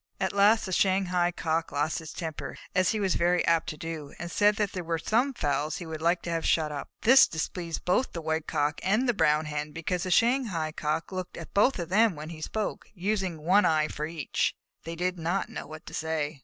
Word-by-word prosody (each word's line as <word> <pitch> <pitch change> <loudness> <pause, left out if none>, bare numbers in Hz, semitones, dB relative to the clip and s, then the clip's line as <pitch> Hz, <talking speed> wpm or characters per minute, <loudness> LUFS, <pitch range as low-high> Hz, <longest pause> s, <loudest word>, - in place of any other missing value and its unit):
At - - -1
last 205 +3 +4
the 190 - -5
Shanghai 185 -2 +2
Cock 165 -1 -1
lost 150 +2 0
his 160 -2 -8
temper, 160 -3 -6 0.2
as 185 0 +3
he 220 - 0
was 195 -3 +1
very 175 +1 +2
apt 165 -1 +2
to 155 - -6
do, 160 -2 -6
and 175 0 -6
said 205 +3 +4
that 205 -1 0
there 185 - -4
were 165 0 -1
some 235 - +1
fowls 150 - -1
he 175 - -7
would 160 -1 -6
like 170 +2 +2
to 170 - -3
have 165 -1 -1
shut 155 -2 +2
up. 145 -1 -6
This 265 +3 +8
displeased 165 0 -4
both 215 +9 +2
the 170 - -5
White 160 0 -1
Cock 145 +1 0
and 215 +7 +2
the 245 - +3
Brown 155 -6 +2
Hen, 150 0 -4
because 170 +2 -2
the 185 - -3
Shanghai 225 -8 +2
Cock 155 +3 -2
had - - -6
looked 185 -1 -5
at 165 - -9
both 215 +7 +4
of 175 -2 -4
them 215 0 +4
when 150 +1 -7
he 160 -2 -9
spoke, 215 +6 -3
using 190 -4 -2
one 190 +5 +5
eye 155 -1 +2
for 150 +1 -4
each, 160 -3 -1 0.3
and 165 - -6
they - - -5
did 180 +1 -2
not 175 +4 -1
know - - -7
what 155 +2 -10
to - - -10
say. 155 -2 -2
170 Hz, 235 wpm, -28 LUFS, 155-195 Hz, 0.3 s, This